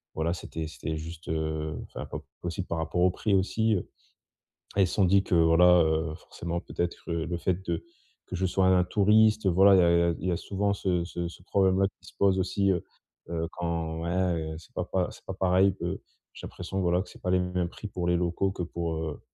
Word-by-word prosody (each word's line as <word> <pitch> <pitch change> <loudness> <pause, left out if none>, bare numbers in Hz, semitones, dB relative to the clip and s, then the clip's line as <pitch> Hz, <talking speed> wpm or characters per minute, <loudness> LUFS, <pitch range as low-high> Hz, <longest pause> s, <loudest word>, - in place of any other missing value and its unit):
voilà 80 +2 0
c'était 80 -2 -5
c'était 80 0 -5
juste, 80 +1 -8
heu, 80 -1 -2
enfin, - - -8
pas - - -5 0.2
possible 90 +2 -3
par 85 - -2
rapport 80 +2 -1
au 90 +1 +5
prix 100 +2 0
aussi, 110 +3 +2
heu, 90 - -3 0.9
elles 95 -2 +4
se - - -4
sont 100 - +4
dit 95 +2 +5
que 95 - 0
voilà, 85 +1 +6
heu, 80 0 0
forcément 85 +1 -5
peut-être 85 -1 -3
le 85 +1 -2
fait 90 +2 -1
de 85 - -2 0.4
que - - -6
je 95 +1 0
sois 95 +1 +1
un 95 0 +5
un - - +4
touriste, 105 +3 +4
voilà, 95 +2 +6
il - - +6
y - - +6
a 85 - +4
il - - +5
y - - +3
a 85 - +3
il 90 - -2
y - - +1
a 85 - 0
souvent 100 +2 -1
ce 90 -3 0
ce 85 0 -4
ce 85 +1 -12
problème-là 95 0 +3 0.2
qui - - -17
se - - -21
pose 95 -1 +3
aussi, 95 +1 +1
heu 90 -2 -1 0.5
heu, 85 -1 -2
quand 85 -1 -3
ouais, 85 - -2 0.4
heu, - - -7
c'est 80 - -15
pas 90 - -2
pa 90 -1 0
c'est - - -15
pas 95 - -4
pareil, 95 +1 +3
heu, 90 +3 -3 0.3
j'ai - - -9
l'impression 95 +1 -5
voilà, 90 -1 +2
que 100 - -9
c'est - - -15
pas 90 - -1
les 90 - +4
mêmes 90 -1 -1
prix 105 - -8
pour 90 -3 -3
les 90 - +3
locaux 90 +2 0
que 95 - -6
pour, 85 -1 -3
heu, 80 -2 -4
90 Hz, 240 wpm, -28 LUFS, 85-95 Hz, 0.9 s, voilà